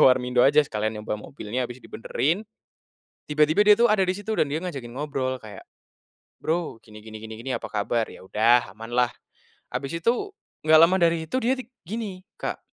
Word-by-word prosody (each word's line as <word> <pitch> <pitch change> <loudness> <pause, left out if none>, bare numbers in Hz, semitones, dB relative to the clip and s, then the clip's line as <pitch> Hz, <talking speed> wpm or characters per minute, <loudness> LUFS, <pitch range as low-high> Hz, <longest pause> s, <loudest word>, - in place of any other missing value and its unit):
warmindo 125 -1 +5
aja 145 +3 +6
sekalian 110 -2 -2
nyoba 105 0 -4
mobilnya 125 +1 -4
abis 120 - -8
dibenerin, 155 - -1 0.8
tiba-tiba 155 +6 +3
dia 210 0 +7
tuh 240 - +6
ada 210 -3 +3
di 185 - +1
situ 205 +3 -3
dan 145 -7 +1
dia 155 - 0
ngajakin 140 -10 -6
ngobrol 130 -1 -2
kayak, 105 -3 -11 0.8
bro 165 -7 -2
gini 105 -1 -14
gini 110 -1 -9
gini 110 0 -8
gini 120 +4 -5
apa - - -3
kabar 110 +2 -1
ya - - -12
udah 115 +3 +3
amanlah, 120 +4 0 0.6
habis 145 +5 -4
itu 240 - 0 0.3
gak 155 0 +6
lama 165 +3 +7
dari 165 -1 +2
itu 160 - -2
dia 255 +3 +2 0.2
gini, 200 -1 -5 0.2
Kak. - - -3
135 Hz, 175 wpm, -25 LUFS, 115-170 Hz, 0.8 s, dia